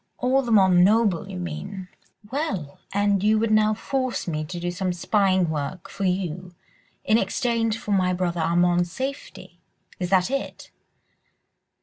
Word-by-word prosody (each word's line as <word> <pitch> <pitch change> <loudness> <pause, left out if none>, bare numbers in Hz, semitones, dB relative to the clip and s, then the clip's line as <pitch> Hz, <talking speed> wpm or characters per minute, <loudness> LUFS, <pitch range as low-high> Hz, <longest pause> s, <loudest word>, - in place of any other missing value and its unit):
"All 260 +2 +2
the 240 -3 -4
more 200 -4 +6
noble, 190 +1 +3
you 190 - -6
mean.... 180 +2 -6 0.4
Well!—and 200 - -2
you 215 +1 +4
would 220 0 0
now 215 0 +3
force 255 0 -2
me 155 -2 -2
to 175 +3 -6
do 175 0 -2
some 180 +1 -2
spying 185 0 +2
work 155 +4 -4
for 195 0 -3
you 180 -1 -2 0.5
in 220 +1 +4
exchange 225 +2 0
for 210 - -6
my 185 -2 +2
brother 175 -2 -1
Armand's 175 +1 +2
safety?—Is 260 -7 -7
that 190 +4 +2
it?" 275 0 -4
190 Hz, 140 wpm, -24 LUFS, 175-215 Hz, 0.5 s, more